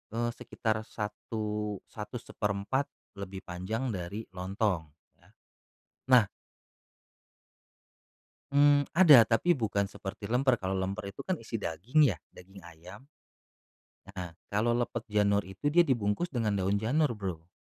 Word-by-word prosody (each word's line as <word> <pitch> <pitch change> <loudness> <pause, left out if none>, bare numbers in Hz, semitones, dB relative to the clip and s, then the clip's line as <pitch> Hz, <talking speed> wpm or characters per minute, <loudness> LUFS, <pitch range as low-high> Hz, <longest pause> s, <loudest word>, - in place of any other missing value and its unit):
eee, 120 +1 0
sekitar 110 -1 -2
satu 105 0 -4 0.2
satu 105 +3 -7
seperempat 105 +3 -2 0.3
lebih 95 -1 -7
panjang 105 +8 -3
dari 100 +3 -5
lontong, 95 -2 -1 0.3
ya. - - -24 0.8
Nah 125 -5 +6 2.3
Mmm, 145 0 +5
ada, 150 -10 +8
tapi 145 +10 +2
bukan 100 -4 0
seperti 100 +1 -7
lemper, 125 0 +3
kalau 95 0 -1
lemper 100 +2 -3
itu - - -8
kan 185 - 0
isi 115 0 -4
daging, 115 - +2
ya? - - -12
Daging 95 +2 -14
ayam. 85 +3 -12 1.1
Heeh, 90 -3 -6 0.2
kalau 115 +3 +2
lepet 120 -1 -2
janur 105 -1 +2
itu 95 +10 -2
dia 175 +3 +6
dibungkus 120 +4 +1
dengan 115 -9 -1
daun 95 +2 +1
janur, 130 +9 +1
Bro. 90 -6 -5
105 Hz, 125 wpm, -30 LUFS, 95-120 Hz, 2.3 s, ada